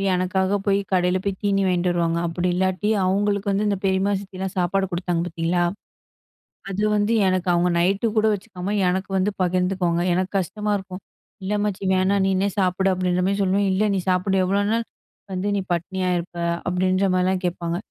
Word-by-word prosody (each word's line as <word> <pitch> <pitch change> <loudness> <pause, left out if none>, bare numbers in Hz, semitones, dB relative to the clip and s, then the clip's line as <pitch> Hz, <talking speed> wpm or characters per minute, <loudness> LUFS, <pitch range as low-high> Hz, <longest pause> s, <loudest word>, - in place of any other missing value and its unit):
எனக்காக 190 +2 0
போய் 200 0 +3
கடையில 180 0 +2
போய் 195 -1 -2
தீனி 195 -1 +2
வாங்கிட்டு 180 -1 +1
வருவாங்க. 170 -1 0
அப்படி 175 +2 -2
இல்லாட்டி 185 +2 0 0.2
அவங்களுக்கு 200 +1 +1
வந்து 205 +2 +1
இந்த 200 - 0
பெரியம்மா, 190 +1 +1
சித்தியலாம் 190 -1 -6
சாப்பாடு 190 +2 +1
குடுத்தாங்க 175 -1 -1
பார்த்தீங்களா? 170 +1 0 1.1
அது 195 +2 -2
வந்து 210 +2 +1
எனக்கு 185 -1 0
அவங்க 175 +1 +2
நைட்‌டு 195 +6 +2
கூட 215 - +4
வச்சுக்காம, 200 -1 -5
எனக்கு 190 +2 -1
வந்து 190 +2 +1
பகிர்ந்துக்குவாங்க, 180 -1 0
எனக்கு 185 0 -1
கஷ்டமா 210 +3 -3
இருக்கும். 190 0 -9 0.4
இல்ல 200 +2 -2
அம்மாச்சி 205 -2 -2
வேணாம் 190 +1 +2
நீனே 190 +1 +1
சாப்பிடு 190 +1 +2
அப்படின்ற 180 0 0
மாரி 200 +1 0
சொல்லுவேன். 195 +1 +2
இல்ல, 195 +3 +1
நீ 190 - +1
சாப்பிடு 185 +1 +1
எவ்ளோ 195 +2 +1
நாள் 230 +1 +1 0.5
வந்து 185 +2 -2
நீ 200 - 0
பட்டினியா 185 +2 -2
இருப்ப? 175 0 -6 0.3
அப்படின்ற 185 +2 +1
மாதிரிலாம் 185 +1 +1
கேட்பாங்க. 170 -1 -2
185 Hz, 170 wpm, -23 LUFS, 180-195 Hz, 1.1 s, கூட